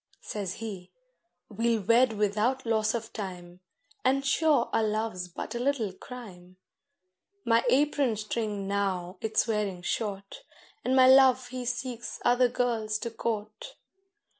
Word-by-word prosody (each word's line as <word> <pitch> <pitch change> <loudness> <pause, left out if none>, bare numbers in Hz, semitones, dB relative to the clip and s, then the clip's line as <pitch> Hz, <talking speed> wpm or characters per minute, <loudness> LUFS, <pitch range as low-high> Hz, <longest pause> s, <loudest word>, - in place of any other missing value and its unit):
Says 200 -4 -4
he, 195 -5 -7 0.6
'We'll 225 0 0
wed 235 +3 +4
without 215 +5 0
loss 220 -1 +1
of 225 -1 -5
time, 180 -4 -7 0.4
And 270 +1 +2
sure 285 -2 +3
our - - +3
love's 215 -4 -2
but 175 - -7
a 240 - -3
little 245 -7 0
crime;' 185 -6 -11 0.9
My 230 0 +3
apron 280 -3 +2
string 210 -2 -3
now 195 -2 -2
it's 220 -1 +1
wearing 205 -5 -2
short, 200 -1 -4 0.4
And 260 - +1
my 260 -1 +7
Love 260 -1 +6
he 250 0 -5
seeks 240 -1 -4
other 245 0 +4
girls 230 -3 -1
to 230 +1 -5
court. 225 - -4
225 Hz, 135 wpm, -28 LUFS, 200-250 Hz, 0.9 s, my